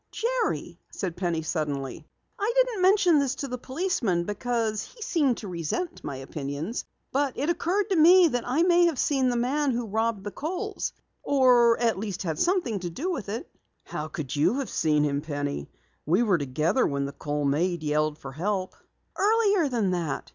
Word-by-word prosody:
"Jerry," 480 Hz, +1 st, -2 dB
said 180 Hz, -4 st, -4 dB
Penny 175 Hz, -3 st, -1 dB
suddenly, 145 Hz, -4 st, -3 dB, 0.3 s
"I 415 Hz, +3 st, +1 dB
didn't -, -, +2 dB
mention 370 Hz, -4 st, +5 dB
this 275 Hz, -2 st, 0 dB
to 280 Hz, -, -4 dB
the 250 Hz, -1 st, -5 dB
policeman 260 Hz, -, -1 dB
because 220 Hz, +1 st, -1 dB
he -, -, -15 dB
seemed 300 Hz, -, +1 dB
to 210 Hz, -, -7 dB
resent 180 Hz, -, -3 dB
my 140 Hz, -, -4 dB
opinions. 145 Hz, -, -5 dB, 0.3 s
But 275 Hz, -1 st, 0 dB
it 295 Hz, +5 st, +1 dB
occurred 385 Hz, +5 st, 0 dB
to -, -, +3 dB
me 350 Hz, +2 st, +7 dB
that 245 Hz, -3 st, -1 dB
I 275 Hz, +7 st, +2 dB
may 350 Hz, -1 st, +5 dB
have 325 Hz, -5 st, -1 dB
seen 265 Hz, -2 st, +2 dB
the 245 Hz, -, 0 dB
man 275 Hz, +5 st, +1 dB
who 240 Hz, -2 st, -1 dB
robbed 220 Hz, -1 st, -1 dB
the 205 Hz, -, -5 dB
Kohls 370 Hz, -, -4 dB, 0.3 s
or 245 Hz, -4 st, +4 dB
at 230 Hz, -4 st, +1 dB
least 200 Hz, -3 st, -4 dB
had 160 Hz, -4 st, -3 dB
something 345 Hz, -, +1 dB
to 175 Hz, -1 st, -4 dB
do 310 Hz, -, -3 dB
with 250 Hz, -, -4 dB
it." 225 Hz, -, -4 dB, 0.4 s
"How 150 Hz, -, -5 dB
could 155 Hz, -3 st, -5 dB
you 150 Hz, -, +2 dB
have 275 Hz, -, -3 dB
seen 150 Hz, -2 st, +2 dB
him, 145 Hz, -1 st, 0 dB
Penny? 145 Hz, -, -4 dB, 0.4 s
We 180 Hz, +9 st, +3 dB
were 195 Hz, -7 st, +2 dB
together 150 Hz, -, +1 dB
when 140 Hz, -1 st, -1 dB
the 140 Hz, -, -4 dB
Kohl 145 Hz, 0 st, -3 dB
maid 165 Hz, +4 st, 0 dB
yelled 150 Hz, 0 st, 0 dB
for 135 Hz, -, -8 dB
help." 185 Hz, +5 st, -2 dB, 0.4 s
"Earlier 410 Hz, -6 st, +3 dB
than 225 Hz, -7 st, 0 dB
that. 170 Hz, -6 st, -3 dB
230 Hz, 185 wpm, -26 LUFS, -, 0.4 s, me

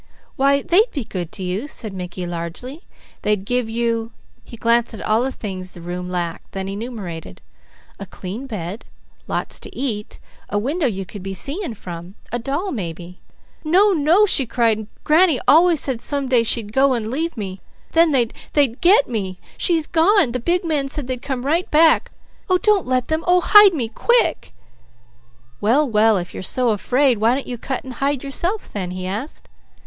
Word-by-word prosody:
"Why 280 Hz, +1 st, +3 dB
they'd 420 Hz, +7 st, +4 dB
be 275 Hz, -, -3 dB
good 180 Hz, -6 st, -5 dB
to 190 Hz, -, -5 dB
you," 185 Hz, +9 st, -3 dB
said 220 Hz, -8 st, -6 dB
Mickey 180 Hz, -1 st, -6 dB
largely. 175 Hz, -, -7 dB, 0.3 s
"They'd 210 Hz, -2 st, 0 dB
give 245 Hz, 0 st, 0 dB
you" 230 Hz, 0 st, -1 dB, 0.3 s
he 235 Hz, -, -11 dB
glanced 235 Hz, +1 st, +1 dB
at -, -, -9 dB
all 215 Hz, +2 st, +2 dB
the 265 Hz, +2 st, -1 dB
things 185 Hz, -6 st, -7 dB
the -, -, -11 dB
room 180 Hz, +1 st, -5 dB
lacked, 175 Hz, -2 st, -4 dB
then 195 Hz, 0 st, -4 dB
enumerated 195 Hz, -, -7 dB, 0.6 s
"a 195 Hz, -, -7 dB
clean 200 Hz, +8 st, -7 dB
bed, 200 Hz, -2 st, -6 dB, 0.4 s
lots -, -, -3 dB
to -, -, -9 dB
eat, 220 Hz, -6 st, -4 dB, 0.3 s
a 205 Hz, -, -1 dB
window 280 Hz, -, 0 dB
you 195 Hz, -4 st, -3 dB
could 200 Hz, +2 st, -10 dB
be 195 Hz, +1 st, -5 dB
seeing 280 Hz, -, -2 dB
from, 175 Hz, 0 st, -9 dB, 0.2 s
a 240 Hz, -, -1 dB
doll, 285 Hz, -, -3 dB
maybe." 175 Hz, -, -6 dB, 0.4 s
"No! 375 Hz, +7 st, +4 dB
No!" 340 Hz, +5 st, +4 dB
she 275 Hz, -, +2 dB
cried. 225 Hz, -3 st, +1 dB, 0.2 s
"Granny 315 Hz, -3 st, +4 dB
always 335 Hz, +1 st, +6 dB
said 255 Hz, -5 st, -1 dB
some 280 Hz, +1 st, -1 dB
day 250 Hz, -2 st, +4 dB
she'd 220 Hz, -2 st, -1 dB
go 270 Hz, 0 st, +3 dB
and 225 Hz, -2 st, -3 dB
leave 320 Hz, +2 st, -2 dB
me; 190 Hz, -3 st, -6 dB, 0.3 s
then 330 Hz, 0 st, +5 dB
they'd 245 Hz, -6 st, +2 dB, 0.5 s
'get' 355 Hz, -4 st, +5 dB
me. 195 Hz, -6 st, -3 dB, 0.2 s
She's 330 Hz, -3 st, +1 dB
gone! 340 Hz, -, +3 dB
The 250 Hz, -, -2 dB
big 350 Hz, +8 st, 0 dB
man 295 Hz, -4 st, 0 dB
said 290 Hz, -1 st, -2 dB
they'd 250 Hz, -1 st, -4 dB
come 265 Hz, -2 st, -4 dB
right 330 Hz, +6 st, 0 dB
back. 320 Hz, +1 st, +4 dB, 0.4 s
Oh 370 Hz, -, +4 dB
don't 410 Hz, -2 st, +2 dB
let 255 Hz, -1 st, 0 dB
them! 315 Hz, +1 st, -1 dB
Oh 360 Hz, 0 st, +5 dB
hide 410 Hz, 0 st, +7 dB
me 245 Hz, -6 st, -1 dB
quick!" 475 Hz, -, +1 dB, 1.1 s
"Well 265 Hz, +8 st, +3 dB
well! 220 Hz, -2 st, +3 dB
If 175 Hz, -1 st, -5 dB
you're -, -, -6 dB
so 250 Hz, +5 st, +1 dB
afraid, 245 Hz, +3 st, +2 dB
why 230 Hz, +3 st, +3 dB
don't 275 Hz, -, -4 dB
you 245 Hz, -2 st, -6 dB
cut 265 Hz, +1 st, -4 dB
and 260 Hz, -, -8 dB
hide 275 Hz, +2 st, -1 dB
yourself 350 Hz, +9 st, -2 dB
then?" 190 Hz, -3 st, -3 dB
he 185 Hz, 0 st, -5 dB
asked. 210 Hz, +11 st, -5 dB
245 Hz, 185 wpm, -20 LUFS, 200-300 Hz, 1.1 s, hide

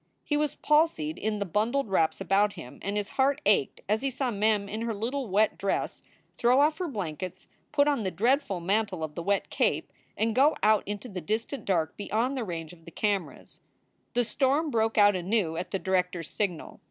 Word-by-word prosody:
He 295 Hz, -, -1 dB
was 300 Hz, 0 st, 0 dB
palsied 300 Hz, -, +1 dB
in 215 Hz, +1 st, -1 dB
the 200 Hz, -, -2 dB
bundled 225 Hz, -, 0 dB
wraps 165 Hz, -5 st, +1 dB
about 195 Hz, +2 st, +2 dB
him 160 Hz, -9 st, -10 dB
and 200 Hz, +1 st, -2 dB
his 205 Hz, -1 st, -2 dB
heart 280 Hz, +2 st, +3 dB
ached 200 Hz, -9 st, +2 dB
as 215 Hz, +2 st, +1 dB
he 275 Hz, -, 0 dB
saw 265 Hz, -1 st, -2 dB
Mem 210 Hz, -1 st, +1 dB
in 215 Hz, +2 st, -4 dB
her 230 Hz, -1 st, -2 dB
little 245 Hz, +5 st, -2 dB
wet 210 Hz, +3 st, +2 dB
dress 195 Hz, -, -1 dB, 0.4 s
throw 245 Hz, +3 st, +4 dB
off 305 Hz, +3 st, +3 dB
her 365 Hz, -, -1 dB
blankets, 185 Hz, -, -5 dB, 0.2 s
put 290 Hz, -1 st, +3 dB
on 285 Hz, -5 st, +2 dB
the 190 Hz, -, -1 dB
dreadful 210 Hz, -, +1 dB
mantle 195 Hz, -1 st, 0 dB
of 155 Hz, -1 st, -4 dB
the 170 Hz, -, -5 dB
wet 200 Hz, +3 st, 0 dB
cape, -, -, 0 dB, 0.2 s
and 225 Hz, +1 st, +1 dB
go 280 Hz, +6 st, +4 dB
out 215 Hz, -1 st, +5 dB
into 205 Hz, +4 st, -5 dB
the 190 Hz, -5 st, -6 dB
distant 225 Hz, -, -3 dB
dark 165 Hz, -5 st, 0 dB
beyond 225 Hz, +6 st, -1 dB
the 255 Hz, -, -2 dB
range 165 Hz, -4 st, -5 dB
of 165 Hz, -2 st, -18 dB
the -, -, -9 dB
cameras. 200 Hz, +2 st, -3 dB, 0.5 s
The 245 Hz, 0 st, +2 dB
storm 280 Hz, +7 st, +1 dB
broke 225 Hz, -1 st, +1 dB
out 205 Hz, -1 st, +6 dB
anew 185 Hz, -2 st, 0 dB
at 175 Hz, -, -4 dB
the 195 Hz, -, -1 dB
director 180 Hz, -2 st, 0 dB
s 165 Hz, -, -9 dB
signal. 190 Hz, -6 st, -3 dB
210 Hz, 205 wpm, -28 LUFS, 185-245 Hz, 0.5 s, out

